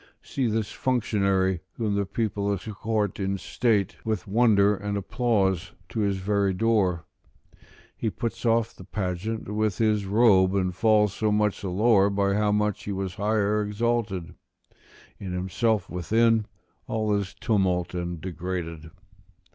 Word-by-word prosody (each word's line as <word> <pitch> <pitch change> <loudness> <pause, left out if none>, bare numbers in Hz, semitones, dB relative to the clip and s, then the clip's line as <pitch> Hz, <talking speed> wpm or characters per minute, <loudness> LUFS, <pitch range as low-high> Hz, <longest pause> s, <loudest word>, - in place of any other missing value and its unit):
See 130 -3 -1
this 110 -1 -1
functionary 100 -7 +1
whom 110 -3 -2
the 100 -1 0
people 100 -2 -1
escort 105 +1 -2
in 95 0 -1
state, 105 +1 0
with 110 -4 -2
wonder 105 -1 +4
and 100 +1 -3
applause, 100 -4 0 0.2
to 100 - -4
his 100 -2 +1
very 100 0 0
door; 100 -6 +1 0.9
he 110 - -1
puts 115 +2 -4
off 115 -1 +2
the - - -11
pageant 100 +3 -3
with 105 -2 0
his 105 -3 +1
robe, 100 -3 +4
and 95 -2 0
falls 105 -1 +3
so 110 0 0
much 105 -1 +1
the 100 - -3
lower 100 +1 +4
by 100 0 +1
how 105 0 +2
much 105 -1 0
he 105 - -3
was 95 -1 -3
higher 105 +1 +1
exalted: 105 -4 -1 0.9
in 95 -2 -5
himself 100 +3 0
within, 110 +5 +2 0.4
all 110 -1 0
is 100 -2 -2
tumult 90 -5 0
and 85 -2 -4
degraded. 85 -3 -5
100 Hz, 140 wpm, -26 LUFS, 95-110 Hz, 0.9 s, wonder